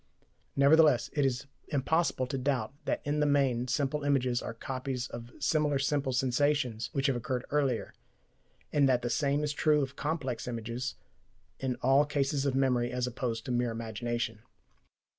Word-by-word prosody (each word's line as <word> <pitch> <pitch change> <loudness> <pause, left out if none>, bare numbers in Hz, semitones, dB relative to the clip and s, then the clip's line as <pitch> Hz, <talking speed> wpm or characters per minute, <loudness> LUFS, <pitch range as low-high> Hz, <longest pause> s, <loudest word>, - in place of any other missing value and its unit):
Nevertheless, 145 -2 +5
it 145 - +1
is 125 0 -2 0.2
impossible 155 -1 +1
to 130 +2 -3
doubt 130 -3 -1
that - - -1
in 145 +1 0
the 150 - +3
main 135 -4 +2
simple 140 +3 0
images 130 -4 +1
are 115 - -6
copies 130 +1 -4
of 115 0 -8
similar 150 -2 +1
simple 135 0 0
sensations 125 -2 +1
which 135 -1 -1
have 135 -3 +3
occurred 125 +1 -3
earlier, 140 -5 0 0.8
and 140 -2 +4
that 125 -2 +2
the 120 - -1
same 140 +3 +1
is 150 0 -1
true 150 0 +3
of 135 +1 -5
complex 140 -6 -3
images 120 +2 -4 0.6
in 130 -2 -1
all 135 +3 +5
cases 140 -1 0
of 135 - 0
memory 125 -3 +2
as 125 0 -1
opposed 120 -2 -3
to - - -3
mere 120 0 +1
imagination. 115 0 -3
130 Hz, 160 wpm, -30 LUFS, 120-145 Hz, 0.8 s, Nevertheless